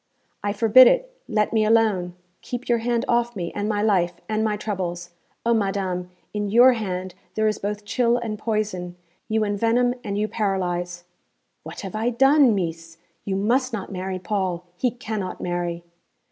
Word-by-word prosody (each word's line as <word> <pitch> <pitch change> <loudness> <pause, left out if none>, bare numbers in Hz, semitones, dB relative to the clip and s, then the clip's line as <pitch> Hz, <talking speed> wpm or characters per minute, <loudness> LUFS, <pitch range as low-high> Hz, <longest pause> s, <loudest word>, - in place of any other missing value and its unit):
'I 205 0 0
forbid 230 +4 +7
it. - - +2
Let 210 0 0
me 220 -1 +3
alone. 215 -5 +2 0.3
Keep 245 0 -6
your 235 -1 +2
hand 235 0 0
off 240 0 +1
me, 175 -3 -4
and 205 +1 -2
my 210 -1 0
life, 180 -5 +2
and 215 0 0
my 215 -1 0
troubles. 175 -4 -4 0.3
O 235 - +4
madame! 195 -4 -1 0.2
in 210 -1 -2
your 245 +4 +7
hand 185 -5 -4 0.2
there 220 0 +2
is 215 - 0
both 205 +1 -4
chill 235 +2 +2
and 220 -3 -4
poison. 210 -6 -2 0.3
You 220 0 +1
envenom 230 +4 +2
and 200 -2 -3
you 210 +1 0
paralyse.' 180 -4 -2 0.6
'What - - -8
have 195 -2 -7
I 220 +3 0
done, 270 0 +5
Meess? 165 -2 -4 0.3
You 195 - -1
must 245 +6 +1
not 200 -3 -4
marry 185 0 -3
Paul. 185 -3 -2
He 250 +7 +1
cannot 220 -5 -5
marry.' 175 -1 -3
210 Hz, 170 wpm, -23 LUFS, 185-230 Hz, 0.6 s, forbid